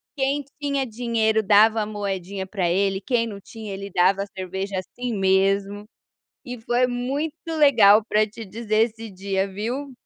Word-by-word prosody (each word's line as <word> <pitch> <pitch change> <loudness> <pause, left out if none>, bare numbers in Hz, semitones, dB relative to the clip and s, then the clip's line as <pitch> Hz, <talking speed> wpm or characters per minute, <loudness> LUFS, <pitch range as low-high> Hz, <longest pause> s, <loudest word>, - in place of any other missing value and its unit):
quem 275 0 -1 0.2
tinha 280 -2 0
dinheiro 220 -1 0
dava 215 +2 +5
a - - -1
moedinha 195 -2 -4
pra 185 -3 -1
ele, 195 +1 +1
quem 230 +1 0
não 200 -2 -7
tinha 215 -2 -9
ele 200 +1 -6
dava 190 +2 +3
a - - -9
cerveja 190 0 -4
assim 245 +6 -5
mesmo, 195 +1 +1 0.6
e 245 -2 -7
foi 240 +2 +1
muito 275 +6 -2 0.2
legal 225 -8 +6
pra 215 0 +3
te 225 +1 -10
dizer 220 +2 0
esse 225 +1 -10
dia 195 0 -2
viu. 240 +8 -4
215 Hz, 160 wpm, -23 LUFS, 195-240 Hz, 0.6 s, legal